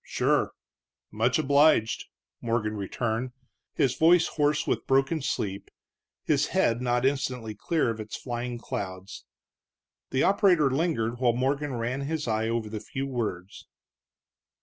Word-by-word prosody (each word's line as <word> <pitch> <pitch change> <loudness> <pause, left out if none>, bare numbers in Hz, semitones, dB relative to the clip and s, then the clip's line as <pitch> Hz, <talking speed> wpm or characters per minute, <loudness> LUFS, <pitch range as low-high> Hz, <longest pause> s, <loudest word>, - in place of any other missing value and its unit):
"Sure - - +1 0.6
much 115 +4 +1
obliged," 145 -5 +3 0.4
Morgan 115 -2 -1
returned, 115 +4 -3 0.4
his 130 -3 +2
voice 165 +1 +5
hoarse 150 -1 +1
with - - -1
broken 135 +4 +2
sleep, 100 -7 -3 0.5
his - - +2
head 115 +1 +1
not 125 0 +1
instantly 130 -5 -1
clear 150 - 0
of 110 - -7
its 110 -1 -6
flying 120 -1 -4
clouds. 95 -4 -6 0.8
The 130 - +1
operator 185 -8 +4
lingered 130 -6 0
while 120 -2 +3
Morgan 135 +3 -1
ran 120 +4 -2
his 150 0 -3
eye 110 0 0
over 115 -1 -1
the 105 0 -5
few 135 +6 -5
words. 105 -8 -4
125 Hz, 130 wpm, -27 LUFS, 110-140 Hz, 0.8 s, voice